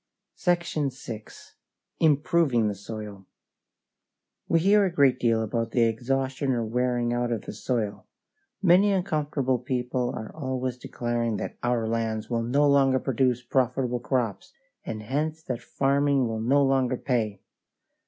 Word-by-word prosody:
SECTION 175 -5 0
VI. 115 -4 -8 0.7
IMPROVING 145 -6 +3
THE - - -2
SOIL 100 -1 -8 1.2
We 165 - +3
hear 205 +3 +5
a 190 - +1
great 140 -6 +3
deal 115 -2 +2
about 115 +1 -2
the 120 - +4
exhaustion 130 +4 0
or 120 -2 -1
wearing 120 +1 0
out 120 0 -1
of 115 -3 -2
the - - -7
soil. 110 -1 -3 0.6
Many 190 +3 +5
uncomfortable 150 -8 0
people 125 0 -2
are 110 - -7
always 130 -4 -3
declaring 120 -3 -2
that - - -5
our 120 -2 0
lands 110 0 -2
will 115 -1 +1
no 140 +5 +2
longer 135 -2 +4
produce 130 -1 0
profitable 125 0 0
crops, 120 -5 -2 0.3
and 110 -1 -5
hence 155 +7 -2
that 125 -5 -4
farming 140 -1 +1
will 110 -1 -3
no 140 +5 +3
longer 135 -2 +2
pay. 110 -7 -1
125 Hz, 140 wpm, -26 LUFS, 115-140 Hz, 1.2 s, hear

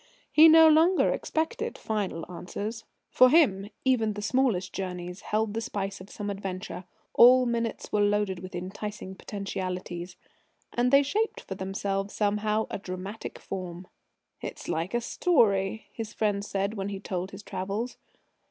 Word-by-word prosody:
He 315 +1 +8
no 320 0 +9
longer 325 +4 +5
expected 315 0 -2
final 200 -6 -3
answers. 200 +6 -6 0.3
For 255 0 +7
him, 210 - +4 0.2
even 225 -5 +2
the 210 0 -6
smallest 220 -6 +1
journeys 180 -1 -5
held 215 0 -1
the 225 - -2
spice 200 -4 -4
of 190 - -12
some 205 -1 -4
adventure; 190 -2 -5 0.3
all 250 +1 +7
minutes 235 -1 -2
were 210 - +2
loaded 205 -2 +1
with 185 0 -8
enticing 190 +2 -6
potentialities. 185 -3 -5 0.6
And 245 +1 +2
they 275 +1 +7
shaped 445 - -1
for - - -6
themselves 195 +1 -3
somehow 210 +1 +1
a - - -3
dramatic 190 +3 -6
form. 180 -1 -6 0.6
"It's - - -7
like 170 +6 -2
a 240 - +1
story," 220 - +2
his 220 -2 -6
friends 205 -2 0
said 200 +1 -1
when 200 -2 -3
he 200 -1 -5
told 185 -1 -4
his 195 +1 -10
travels. 200 +7 -4
205 Hz, 150 wpm, -28 LUFS, 190-230 Hz, 0.6 s, no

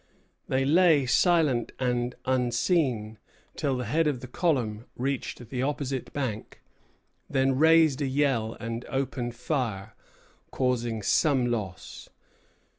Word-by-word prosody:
They 135 0 +1
lay 160 -2 +4
silent 145 -3 +2
and 125 -1 -1
unseen 125 - 0 0.4
till 140 -4 -1
the 125 - -3
head 155 +8 +1
of 140 -4 -1
the 130 - -7
column 125 -7 -1
reached 125 -2 -4
the 125 -2 -2
opposite 135 -1 -3
bank; 120 -7 -5 0.7
then 135 0 +2
raised 160 -1 +4
a 140 - 0
yell 130 -5 0
and 115 +1 -4
opened 125 -2 -3
fire, 115 -6 -3 0.6
causing 120 -4 -1
some 135 +2 +2
loss. 100 -6 -5
130 Hz, 115 wpm, -27 LUFS, 120-140 Hz, 0.7 s, lay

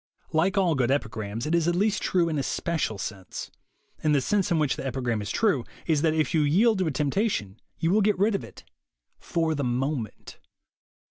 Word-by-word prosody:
Like 180 +6 +2
all 180 -4 +3
good 130 -4 +1
epigrams, 110 -4 -2
it 155 - -1
is 170 -1 +2
at 175 - +2
least 205 +3 +1
true 175 -2 +2
in 155 -3 -1
a - - +1
special 155 -7 -1
sense. 95 -2 -6 0.5
And 150 -1 +3
the - - +4
sense 205 +7 +1
in 170 - +2
which 150 -3 +1
the - - -6
epigram 125 -4 -1
is 100 - -5
true 185 - +2 0.2
is 155 -4 +2
that 160 0 +2
if 155 -1 +1
you 160 - +3
yield 195 +9 +3
to 185 - +1
a - - 0
temptation, 140 - -1 0.2
you 165 - +1
will 215 +3 +4
get 210 0 +2
rid 205 +4 +2
of 195 - -1
it - - -12 0.6
for 165 -1 0
the 145 -2 -2
moment. 125 -2 -3
155 Hz, 210 wpm, -26 LUFS, 130-180 Hz, 0.6 s, the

